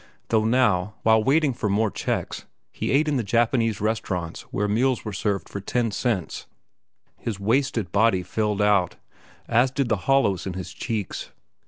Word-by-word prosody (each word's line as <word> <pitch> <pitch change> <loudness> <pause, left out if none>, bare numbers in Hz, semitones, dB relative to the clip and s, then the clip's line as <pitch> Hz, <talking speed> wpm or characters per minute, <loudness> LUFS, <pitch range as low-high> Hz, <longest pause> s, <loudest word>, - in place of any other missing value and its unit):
Though 110 -1 +2
now, 105 -5 +2
while 110 -1 +4
waiting 145 +1 +3
for 105 - -2
more 105 +1 +1
checks, - - -3 0.3
he - - -4
ate 150 +3 +3
in 145 -2 +1
the 120 - 0
Japanese 115 +1 +1
restaurants 95 -6 -2
where 105 +1 0
meals 120 +5 +1
were 105 - -4
served 100 0 -1
for 100 - -6
ten 115 +3 -1
cents, 100 -4 -2 0.7
his 105 -4 -4
wasted 115 -2 0
body 100 -2 +3
filled 105 +2 -1
out, 100 -4 +2 0.5
as 120 +3 +3
did 130 -1 -1
the 110 - +2
hollows 100 -10 +2
in 95 - -3
his 90 0 -6
cheeks. 110 -1 -4
110 Hz, 165 wpm, -24 LUFS, 100-120 Hz, 0.7 s, while